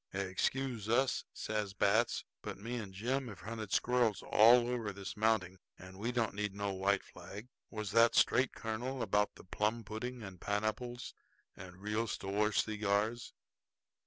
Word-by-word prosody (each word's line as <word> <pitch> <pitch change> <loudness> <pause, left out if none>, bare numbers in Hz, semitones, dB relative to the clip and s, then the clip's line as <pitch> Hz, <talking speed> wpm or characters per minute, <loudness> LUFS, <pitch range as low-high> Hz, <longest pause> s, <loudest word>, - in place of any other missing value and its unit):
"Excuse 110 +4 -1
us," 125 +2 +2
says 105 -2 -3
Batts, 110 +4 +2 0.2
"but - - -6
me 115 +5 -4
and 105 -5 -5
Jim 125 +7 -1
have 100 -6 -9
hunted 110 +1 -6
squirrels 120 -4 +2
all 120 +3 +6
over 120 -4 -2
this 100 0 -7
mounting, 105 -4 +1 0.2
and 95 +1 -12
we 115 +4 -1
don't 120 -2 0
need 105 -1 -2
no 100 -1 -2
white 95 +1 +1
flag. 105 +5 -10 0.2
Was 105 -3 -4
that 115 +2 +5
straight, 130 0 +4
colonel, 120 +3 -3
about 105 -1 +1
the - - -13
plum 105 +5 -1
pudding 115 +3 -5
and 95 -3 -9
pineapples 110 +4 -2 0.4
and 90 -1 -10
real 105 +2 0
store 105 +1 0
cigars?" 105 +2 0
110 Hz, 155 wpm, -34 LUFS, 100-120 Hz, 0.4 s, all